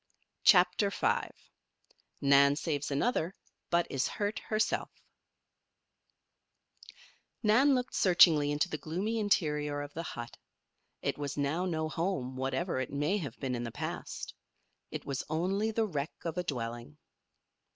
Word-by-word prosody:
CHAPTER 180 +1 +5
V - - 0 0.9
NAN 140 0 +6
SAVES 150 -2 -2
ANOTHER, 170 - 0 0.3
BUT 170 0 +3
IS 135 -1 0
HURT 205 +1 -2
HERSELF 215 0 0 2.5
Nan 255 +6 +5
looked 250 0 -2
searchingly 165 -5 +6
into 145 0 +1
the 155 - -4
gloomy 200 +8 -2
interior 150 -8 +1
of 145 - -9
the 165 - -4
hut. 120 -7 -7 0.7
It - - -1
was 145 -1 -4
now 145 +6 0
no 160 -3 -1
home, 155 -6 -2
whatever 135 +5 -1
it 130 - -3
may 145 +8 0
have 140 - -6
been 130 -2 -2
in 120 -1 -2
the 120 - -3
past. - - -5 0.6
It - - -6
was 140 -1 -3
only 190 +7 0
the 225 0 +1
wreck 155 -6 -3
of 165 - -2
a 180 - -1
dwelling. 120 - -5
155 Hz, 135 wpm, -31 LUFS, 140-190 Hz, 2.5 s, NAN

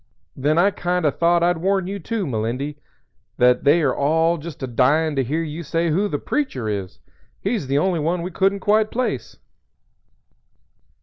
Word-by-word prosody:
_ - - -40 0.3
Then 145 +4 +1
I 195 +4 +4
kind 180 -2 -1
o' 150 - +4
thought 170 +2 +2
I'd 175 -1 +2
warn 190 +1 +1
you, 200 +2 -4
too, 215 +2 -3
Melindy, 130 +4 -3 0.6
that 125 0 +3
they 155 +2 +4
all 160 +5 +2
are - - -8
just 160 -4 -8
a - - -2
dyin' 145 +6 +2
to 135 - +1
hear 155 +7 -1
you 155 +1 -5
say 165 +1 -1
who 195 +7 +1
'The 145 - -2
Preacher' 140 - -2
is. 100 - -4 0.4
He's 200 - -2
the 135 +1 +1
only 180 +2 +1
one 170 +3 -1
we 180 - -5
couldn't 195 +2 +1
quite 215 +2 +2
place." 230 - -3
165 Hz, 185 wpm, -21 LUFS, 140-185 Hz, 0.6 s, I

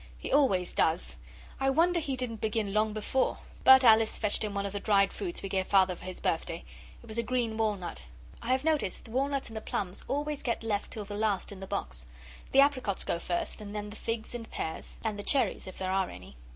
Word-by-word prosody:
He - - -6
always 200 -11 +3
does. - - +1 0.4
I 270 0 +2
wonder 340 +5 +3
he 280 -4 -2
didn't 235 -4 -3
begin 215 -2 -1
long 215 +1 +2
before 215 +5 0 0.3
but 265 0 +9
Alice 225 -2 +6
fetched 210 -1 +1
him 210 -1 -3
one 200 0 -1
of 200 - -4
the 205 - -2
dried 200 -1 +3
fruits 355 -3 -4
we 195 - -3
gave 190 -1 0
Father 190 -2 +4
for - - -12
his 185 -1 -5
birthday. 165 +1 -1 0.4
It - - -14
was 220 +1 -3
a - - +4
green 235 -2 -1
walnut. 205 - -2 0.3
I - - -7
have 260 +2 +2
noticed 305 - 0
the 225 - -11
walnuts 275 +2 0
and 220 - -7
the - - -4
plums 190 -3 -3
always 290 +1 -1
get 235 -2 -2
left 210 -2 -1
till 210 -2 -4
the 205 - -7
last 205 -2 0
in 200 - -9
the 195 - -7
box; - - -3 0.4
the 275 - +7
apricots 255 -8 +1
go 170 - -1
first, 175 +4 -3
and 205 0 -7
then 210 0 -4
the - - -9
figs 225 0 -4
and 235 -2 -6
pears; 160 - -5
and 215 -2 -2
the - - -4
cherries, 270 -4 +1
if 185 - -8
there 185 0 -2
are 190 -1 +1
any. 90 -6 -11
215 Hz, 230 wpm, -30 LUFS, 195-255 Hz, 0.4 s, but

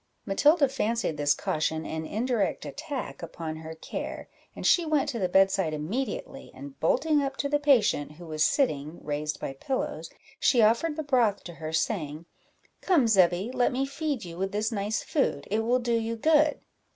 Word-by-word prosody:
Matilda 290 - +4
fancied 230 - -1
this 145 0 +2
caution 160 +1 -1
an 160 0 -4
indirect 225 -2 -1
attack 290 -3 -6
upon 160 -1 -6
her 160 0 -8
care, - - -6 0.3
and - - -6
she 350 - +5
went 310 -3 +1
to 240 -5 -3
the 185 -2 0
bedside 190 -4 +3
immediately, 195 - -4
and 280 -1 -10
bolting 320 -13 +2
up 275 -1 -3
to 280 - -1
the 290 +1 +1
patient, 245 - +3
who 170 +3 -12
was 155 -1 0
sitting, 155 - +1
raised 150 +1 -3
by 135 - -4
pillows, 260 - -3 0.3
she 250 - +3
offered 235 +9 +3
the 315 - -3
broth 245 -8 +2
to 175 - -8
her, 160 -1 -6
saying 160 -2 -2 0.6
"Come, 335 -9 +3
Zebby, 190 +1 +3
let 245 - +2
me 265 +2 0
feed 280 - -3
you 170 0 -8
with 195 0 -1
this 215 +2 0
nice 210 0 -2
food 265 - -1
it 215 - +2
will 235 +3 +2
do 240 -1 -1
you 230 0 0
good." 305 +5 +3
220 Hz, 180 wpm, -27 LUFS, 160-275 Hz, 0.6 s, she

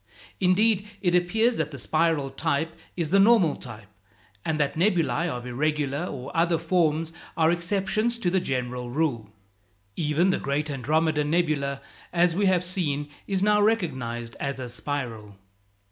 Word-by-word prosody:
Indeed, 200 +2 +3 0.2
it 175 -2 +2
appears 220 +7 +2
that 155 -2 -1
the 140 - -8
spiral 155 -1 +1
type 160 +3 -1 0.2
is 165 -3 -2
the 195 - +5
normal 195 -7 +5
type, 110 -4 -10 0.6
and 160 -1 -1
that 145 -2 +1
nebulæ 175 -1 +1
of 125 -4 -5
irregular 145 +4 -1
or 135 -3 -7
other 165 0 +3
forms 165 -1 0 0.2
are 160 0 +4
exceptions 195 +6 0
to 180 -7 -1
the 190 - +3
general 125 -5 -3
rule. 120 -6 -1 0.7
Even 160 +4 +2
the - - 0
great 145 +2 -1
Andromeda 150 +3 +1
nebula, 145 -4 0 0.3
as 175 -1 +3
we 200 +1 +2
have 180 -1 +2
seen, 150 -6 0 0.2
is 195 -1 0
now 210 0 +4
recognized 130 - -1
as 140 -1 -3
a 125 -1 -5
spiral. 120 -6 -4
160 Hz, 150 wpm, -26 LUFS, 140-180 Hz, 0.7 s, the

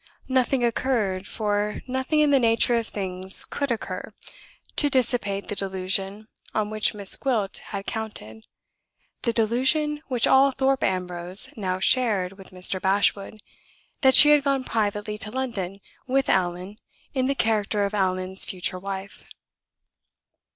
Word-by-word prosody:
Nothing 260 -1 +1
occurred 225 -6 -1
(for 210 -1 -2
nothing 260 +4 0
in 295 -1 +3
the 275 - +5
nature 230 0 +3
of 230 -1 -1
things 190 -1 +3
could 280 -1 -3
occur) 195 -3 -5 0.6
to 290 - +3
dissipate 240 -6 0
the 205 - -4
delusion 195 +2 -2 0.3
on 215 -1 -1
which 215 0 0
Miss 200 -2 0
Gwilt 225 -8 -1
had 200 -1 -6
counted 110 - -6 0.7
the 235 - 0
delusion 260 +7 +1
which 250 -3 +1
all 270 +1 +5
Thorpe 265 0 0
Ambrose 180 0 -2
now 185 -3 -3
shared 195 -3 +1
with 195 -1 -14
Mr. 185 0 -1
Bashwood, 200 +2 0 0.6
that 265 -2 +5
she 295 - +9
had 295 -1 +5
gone 275 -2 0
privately 210 -2 -2
to 210 - -1
London 210 -7 -4 0.3
with 270 +1 +1
Allan 185 +2 -1 0.3
in 260 -2 0
the 275 - 0
character 215 -3 0
of 200 - -4
Allan's 185 -1 0
future 185 0 -2
wife. 195 +1 -7
210 Hz, 140 wpm, -24 LUFS, 190-255 Hz, 0.7 s, she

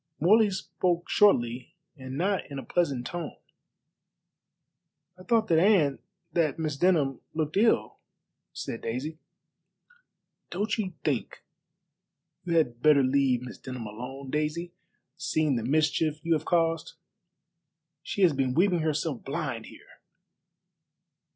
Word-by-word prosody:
Morley 210 +6 +5
spoke 180 -2 -2
shortly 120 - +3 0.2
and 130 -1 -7
not 190 +2 0
in 140 - -6
a 135 - -6
pleasant 140 -5 0
tone. 170 0 -5 1.8
"I 185 - -16
thought 220 +4 +2
that 165 -1 +5
Anne, 170 -8 +3 0.3
that 155 -5 +1
Miss 155 -3 -2
Denham, 150 -5 +2
looked 155 -1 -2
ill," 225 +3 +2 0.5
said 115 - -6
Daisy. 140 +8 -4 1.3
"Don't 205 +4 -1
you 185 -5 -3
think 135 -7 -2 1.0
you 170 -1 +1
had 120 -7 +1
better 150 -2 +5
leave 130 -2 +2
Miss 125 - -9
Denham 125 -3 -7
alone, 130 +5 -7
Daisy, 155 +3 -2 0.4
seeing 155 -4 0
the 115 - -1
mischief 155 +3 +1
you 170 - +3
have 155 -1 -1
caused? 165 -2 +1 1.1
She 195 +4 -2
has 170 -4 +5
been 130 -2 0
weeping 180 +1 +3
herself 155 -3 -1
blind - - -4
here." - - -16
155 Hz, 125 wpm, -28 LUFS, 135-175 Hz, 1.8 s, Morley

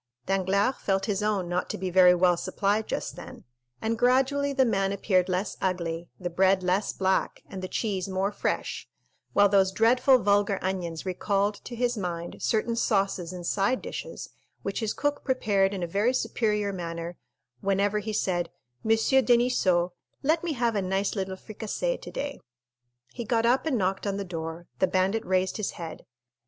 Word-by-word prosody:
Danglars 195 +5 +1
felt 195 -1 0
his 205 -2 -1
own 205 -4 0
not 175 +1 -1
to - - -3
be 185 0 -3
very 180 0 +7
well 180 0 +4
supplied 200 +4 0
just - - -3
then, - - -10 0.4
and 225 +1 -1
gradually 270 +3 +3
the 270 -1 +3
man 195 -4 +1
appeared 190 -2 +1
less 185 +3 -1
ugly, 170 -2 -2
the 180 - -3
bread 190 +2 +3
less 185 +3 +1
black, 190 0 0
and 190 - -7
the 185 - -4
cheese 195 -3 -2
more 190 +1 0
fresh, 205 - -3 0.4
while 205 0 +6
those 195 -1 +3
dreadful 245 +6 +5
vulgar 205 -2 +2
onions 180 -3 -3
recalled 200 +2 0
to 240 - -6
his 245 0 0
mind 170 -2 -4
certain 230 +1 +1
sauces 195 -6 0
and 180 -1 -7
side 200 +8 +1
dishes, - - -6 0.3
which 200 - -2
his 220 -2 -1
cook 290 0 -1
prepared 205 -7 +2
in 190 -3 -3
a - - -1
very 210 +9 +1
superior 210 -5 0
manner 170 -1 -5 0.4
whenever 200 +3 +1
he 215 +1 -4
said, 175 -4 0 0.3
"Monsieur 225 +4 +4
Deniseau, 235 -9 +3 0.3
let 315 +4 +2
me 335 -3 -1
have 235 -3 0
a 200 - +1
nice 195 +2 -1
little 190 -1 -2
fricassee 220 - -3
today." 280 0 -5 0.7
He 240 - -4
got 230 0 +1
up 255 +6 +3
and 275 -6 +1
knocked 195 0 -1
on 200 0 -1
the 200 - -3
door; 165 -1 -6
the 190 - +4
bandit 190 +4 +1
raised 185 0 0
his 215 - -2
head. 165 -2 -8
195 Hz, 175 wpm, -27 LUFS, 185-225 Hz, 0.7 s, very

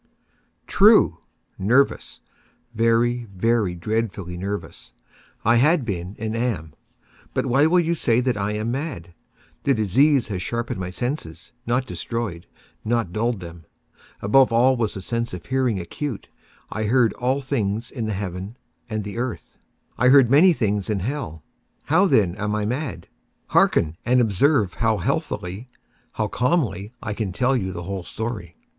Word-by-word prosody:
True!—nervous—very, 120 - +1
very 110 -2 +1
dreadfully 100 -2 -3
nervous 100 +3 -6 0.5
I 115 +2 +5
had 150 +2 +3
been 95 -2 -4
and 110 0 -3
am; 105 -11 -2 0.6
but - - 0
why 140 +5 +4
will 180 +2 +4
you 170 0 +1
say 120 -8 +2
that 125 0 0
I 105 0 -2
am 110 +2 -2
mad? 125 - -5 0.5
The 140 - +2
disease 125 - +3
had 95 -4 -3
sharpened 115 +1 -3
my 90 -1 -4
senses—not 120 - -3
destroyed—not 115 -1 -4
dulled 115 -1 -1
them. 85 -1 -10 0.6
Above 130 +6 +5
all 125 +3 +4
was 115 -4 -1
the 95 - -6
sense 115 -3 -2
of 90 - -10
hearing 130 -6 0
acute. 115 - -5 0.4
I 110 0 -2
heard 120 +1 +3
all 130 +3 0
things 115 -4 -2
in 115 -4 -4
the 110 - -1
heaven 95 +3 -5 0.3
and 110 -2 -3
in 100 - -6
the - - -5
earth. 125 -1 -5 0.4
I 125 - +4
heard 130 -2 +6
many 165 +7 +7
things 105 - -1
in 105 -3 0
hell. 100 - -4 0.4
How, 180 +6 +3
then, 100 - +3
am 105 0 -1
I 105 -1 -1
mad? 120 - -3 0.4
Hearken! 80 0 +3
and 125 +1 +3
observe 110 - +2
how 115 -2 +1
healthily—how 100 +4 -4
calmly 120 - 0
I 105 - -3
can 105 -2 -3
tell 125 +7 +1
you 95 -6 -1
the 85 -1 -6
whole 95 +1 -4
story. 105 -3 -5
115 Hz, 145 wpm, -23 LUFS, 95-125 Hz, 0.6 s, many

